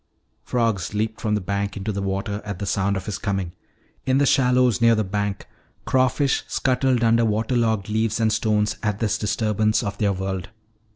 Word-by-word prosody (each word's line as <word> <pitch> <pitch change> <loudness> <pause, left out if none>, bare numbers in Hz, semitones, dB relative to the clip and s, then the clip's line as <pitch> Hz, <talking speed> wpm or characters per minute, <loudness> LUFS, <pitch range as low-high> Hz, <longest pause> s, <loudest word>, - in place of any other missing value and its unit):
Frogs 110 -6 -1
leaped 110 +1 -2
from 105 -2 0
the 105 - -1
bank 100 +2 -2
into 100 +2 -3
the 100 -1 -3
water 100 +2 -2
at 100 -3 -5
the 100 - -4
sound 100 0 0
of 95 - -6
his 105 - -4
coming. 95 -3 -2 0.5
In 130 0 +2
the 140 - +3
shallows 125 -4 +3
near 115 0 +5
the 110 - +1
bank, 100 0 -3 0.4
crawfish 130 +2 +2
scuttled 130 -2 +1
under 115 0 +4
water 110 +3 0
logged 110 -4 +1
leaves 110 +1 0
and 110 -1 +2
stones 105 -1 +1
at 105 -2 -1
this 110 -1 -1
disturbance 105 +2 +1
of 100 -1 -4
their 105 -2 +2
world. 95 -1 -4
105 Hz, 185 wpm, -23 LUFS, 100-115 Hz, 0.5 s, near